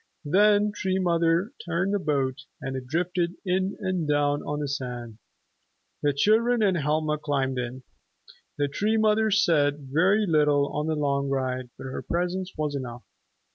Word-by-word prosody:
Then 205 +5 +4
Tree 190 -2 -1
Mother 170 +2 +2
turned 180 +3 -1
the 205 - +1
boat, 140 -4 -1
and 135 0 -5
it 130 -1 -6
drifted 175 +3 -1
in 185 +1 0
and 185 -5 -1
down 145 0 +2
on 150 - -3
the 145 - -2
sand. 125 -5 -5 0.8
The 145 - +2
children 220 - +3
and 195 -3 +3
Helma 150 0 0
climbed 135 -3 -1
in. 125 +1 -5 0.7
The 145 -1 +1
Tree 210 +10 0
Mother 220 0 +3
said 150 -9 +2
very 195 +7 +3
little 150 -4 +3
on 150 +1 -2
the 160 - 0
long 140 -2 0
ride, 130 -2 -2
but - - -9
her 130 -1 -5
presence 180 +2 -2
was 150 -1 -1
enough. 125 -3 -5
150 Hz, 160 wpm, -26 LUFS, 140-185 Hz, 0.8 s, Then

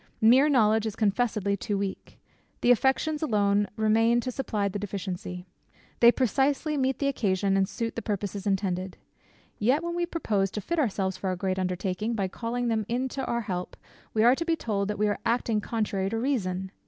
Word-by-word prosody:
Mere 255 +7 +6
knowledge 220 -4 +3
is 215 - -4
confessedly 210 -2 +1
too 205 +1 -2
weak. 195 -1 -5 0.4
The 245 - +5
affections 265 +5 +2
alone 205 -7 +2
remain 225 +2 +3
to 255 - -3
supply 215 -6 -1
the 200 +1 -4
deficiency. 180 -2 -5 0.5
They 235 0 +8
precisely 275 +5 +1
meet 265 -1 0
the 280 - 0
occasion, 195 -7 +1
and 195 -1 +2
suit 230 -2 -4
the 230 - -3
purposes 205 -1 -3
intended. 190 -2 -1 0.6
Yet, 260 +9 +2
when 340 0 -3
we 345 0 -1
propose 210 - 0
to 210 - -3
fit 340 - -2
ourselves 190 -8 0
for 190 - -4
our 185 - 0
great 185 +1 -2
undertaking, 185 +4 -2
by 195 -3 -1
calling 240 +4 -3
them 220 -2 +1
in 255 +3 -1
to 270 +1 -4
our 235 0 0
help, 180 -4 -5 0.3
we 220 - +2
are 240 +2 +7
to 300 - -1
be 335 -1 +1
told 205 -9 -2
that 210 - -3
we 210 +1 +2
are 205 - -1
acting 230 -2 +1
contrary 205 -4 -1
to 225 - -2
reason. 190 -7 -1
215 Hz, 190 wpm, -27 LUFS, 195-245 Hz, 0.6 s, They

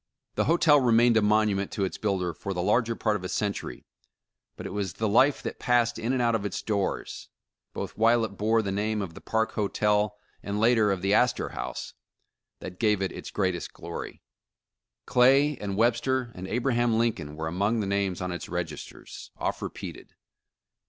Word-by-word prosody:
The - - 0
hotel 155 -2 +5
remained 120 -2 +4
a 110 - +5
monument 105 -2 +2
to 100 - 0
its 95 - -5
builder 95 -5 -1
for 100 -1 -5
the 90 - -1
larger 115 +3 +2
part 110 -2 0
of 95 - -4
a 90 - -4
century, 100 -2 -3 0.7
but - - -8
it - - -5
was 100 -4 -2
the 110 - -1
life 130 +7 +3
that - - -5
passed 120 -2 +2
in 115 +2 -1
and 130 - 0
out 120 -1 +2
of 110 -3 0
its 105 - -4
doors, 100 -3 -3 0.4
both - - -6
while 115 +1 +3
it - - -5
bore 110 +3 +1
the 100 - -2
name 105 +1 -1
of 85 -4 -7
the - - -11
Park 110 0 0
Hotel, 105 0 0 0.2
and 100 +1 -3
later 110 -1 +4
of 95 -2 -2
the 100 +1 +2
Astor 125 +3 +2
House, - - -6 0.7
that 90 0 -8
gave 105 -3 +2
it 95 - -2
its - - -8
greatest 95 -4 -2
glory. 85 0 -8 0.8
Clay 135 +4 +4
and 100 -1 -4
Webster 120 +2 +1
and 90 +1 -7
Abraham 120 0 +1
Lincoln 85 -11 -1
were 80 +1 -4
among 100 +7 0
the 105 - -1
names 100 -2 -1
on 90 0 -2
its 90 - -6
registers, - - -6
oft - - -2
repeated. - - -8
105 Hz, 185 wpm, -27 LUFS, 100-115 Hz, 0.8 s, hotel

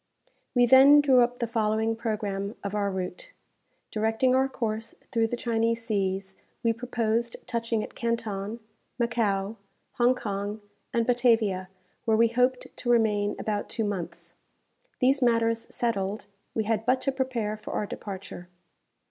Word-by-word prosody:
We 245 0 +6
then 270 +4 +8
drew 270 -4 +5
up 245 +1 +1
the 240 - -1
following 220 0 0
programme 210 -2 -3
of 200 0 -4
our 205 -1 0
route: 190 - -5 0.6
Directing 225 +4 +2
our 265 +1 +3
course 225 -3 -3 0.2
through 230 -3 +2
the 240 - -3
Chinese 230 -1 0
seas, 190 -3 -1 0.3
we 230 -1 +3
proposed 230 0 -1
touching 230 -2 -1
at - - -8
Canton, 230 -2 -3 0.4
Macao, 225 -3 0 0.4
Hong 245 +1 +5
Kong, 205 -2 -4 0.3
and 235 -1 +1
Batavia, 225 -6 +2 0.4
where 220 -2 +3
we 230 0 +5
hoped 250 +2 0
to 240 - -4
remain 210 -3 +2
about 210 -1 -2
two 225 - -2
months. 200 -5 -5 0.6
These 270 +2 +3
matters 230 -1 +2
settled, 205 -3 -1 0.3
we 220 - +1
had 220 0 0
but 255 +3 +2
to 275 - +1
prepare 255 -5 -2
for 215 0 -8
our 210 - -1
departure. 190 -3 -8
225 Hz, 145 wpm, -27 LUFS, 210-240 Hz, 0.6 s, then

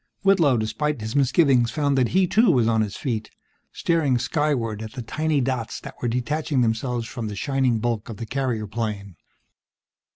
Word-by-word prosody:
Whitlow, 170 -10 +4
despite 130 +6 -1
his 110 +3 -5
misgivings, 135 -3 +3
found 145 0 0
that 130 -2 +3
he, 190 +6 +3
too, 220 +5 +3
was 125 -9 +3
on 110 -1 +2
his 105 -2 -3
feet, 110 -5 -3 0.4
staring 155 -7 +1
skyward 125 -5 -1
at 110 0 -7
the 125 - -6
tiny 155 +3 0
dots 125 -3 -2
that 135 - -9
were 120 - 0
detaching 130 +4 0
themselves 120 +1 0
from 115 -1 -5
the 105 - -5
shining 130 +1 +1
bulk 115 -1 -2
of 110 - -7
the 115 - -5
carrier 125 -3 -2
plane. 105 -3 -4
125 Hz, 175 wpm, -24 LUFS, 110-145 Hz, 0.4 s, Whitlow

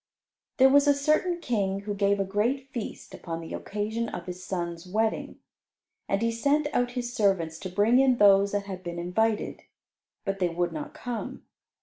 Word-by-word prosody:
There 265 - +7
was 285 +1 +5
a 285 - +5
certain 310 +5 +1
King 200 - -1
who 205 0 -4
gave 200 0 +2
a - - +2
great 230 +8 -1
feast 235 -4 -6
upon 165 -2 -5
the 165 - -8
occasion 220 +3 -3
of 175 - -6
his 180 0 -7
son's 170 -1 -4
wedding. 220 +4 -1 0.7
And 195 +3 +1
he 230 - +2
sent 285 +6 +1
out 245 0 +1
his 245 -1 -3
servants 180 -7 +1
to 185 - -5
bring 210 +7 +3
in 265 -2 +4
those 200 -1 +6
that 200 -1 -1
had 190 -2 -6
been 175 -1 -6
invited, 210 +5 0 0.6
but 195 -1 -2
they 180 -2 +2
would 175 +1 -1
not 155 -2 -6
come. 245 -2 -6
205 Hz, 185 wpm, -27 LUFS, 185-245 Hz, 0.7 s, There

